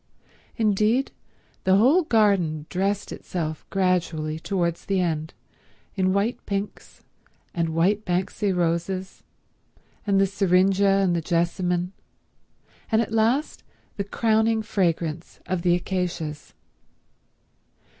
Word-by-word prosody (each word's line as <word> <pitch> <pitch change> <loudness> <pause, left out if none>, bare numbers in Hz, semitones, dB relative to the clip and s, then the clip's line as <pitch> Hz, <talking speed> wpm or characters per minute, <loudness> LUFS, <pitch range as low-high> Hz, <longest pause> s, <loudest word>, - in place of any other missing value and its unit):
Indeed, 220 +3 +2 0.5
the 190 0 +4
whole 260 - +5
garden 200 - +2
dressed 195 +2 -1
itself 155 -3 -5
gradually 175 -5 0
towards 170 -2 -2
the 195 -1 0
end 160 -3 -2 0.6
in 185 -2 +1
white 200 +5 0
pinks 200 +1 -5 0.5
and 165 -1 0
white 185 +6 +1
banksai 185 +2 -1
roses, 180 +2 -2 0.9
and 195 -1 +3
the 195 - +5
syringe 195 0 +2
and 195 -3 +3
the 170 - 0
Jessamine, 175 +2 0 1.0
and 220 - +4
at 225 -1 -1
last 230 +7 +1 0.3
the 200 - -2
crowning 220 +2 +1
fragrance 170 -6 -2
of 180 0 -2
the 175 0 +3
acacias. 175 -4 -4
185 Hz, 105 wpm, -24 LUFS, 170-205 Hz, 1.0 s, whole